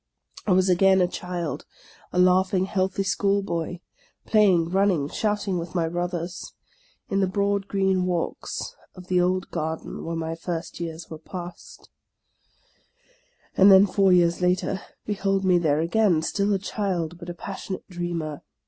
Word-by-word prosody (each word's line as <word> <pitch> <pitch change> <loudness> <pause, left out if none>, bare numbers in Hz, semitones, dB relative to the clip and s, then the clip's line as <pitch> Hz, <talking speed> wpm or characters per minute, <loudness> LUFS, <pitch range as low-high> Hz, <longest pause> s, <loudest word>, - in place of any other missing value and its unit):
I - - +2
was 185 +1 +3
again 190 +1 +4
a 180 - +4
child, 175 -3 -5 0.2
— - - -26
a - - -4
laughing, 185 +1 +4
healthy 190 +1 -1
schoolboy, 195 -4 -1 0.4
play 215 -1 +4
ing, 170 -3 +3
running, 190 -6 +2
shouting 205 -3 -1
with 170 +1 -7
my 165 -2 +1
brothers, 175 +1 -4 0.6
in 195 - +2
the 190 - +2
broad 200 +1 0
green 190 -2 +1
walks 175 -2 -3 0.2
of 180 -1 -12
the 180 -1 +3
old 185 +1 0
garden 160 -1 -4
where 165 0 -3
my 165 0 -3
first 165 0 -5
years 165 -1 -6
were 160 - -7
passed. 175 +2 -9 1.6
And 195 +1 +7
then, 190 +1 +8
four 195 -1 +3
years 175 -1 +3
later, 180 +1 +1 0.2
behold 195 -2 0
me 180 -2 +4
there 155 -2 +2
again, 170 -1 +2
still 200 +4 0
a 200 - +3
child, 185 -4 -3
but 170 - -8
a 175 - -5
passionate 190 +1 -6
dreamer. 170 -5 -4
180 Hz, 155 wpm, -25 LUFS, 170-195 Hz, 1.6 s, then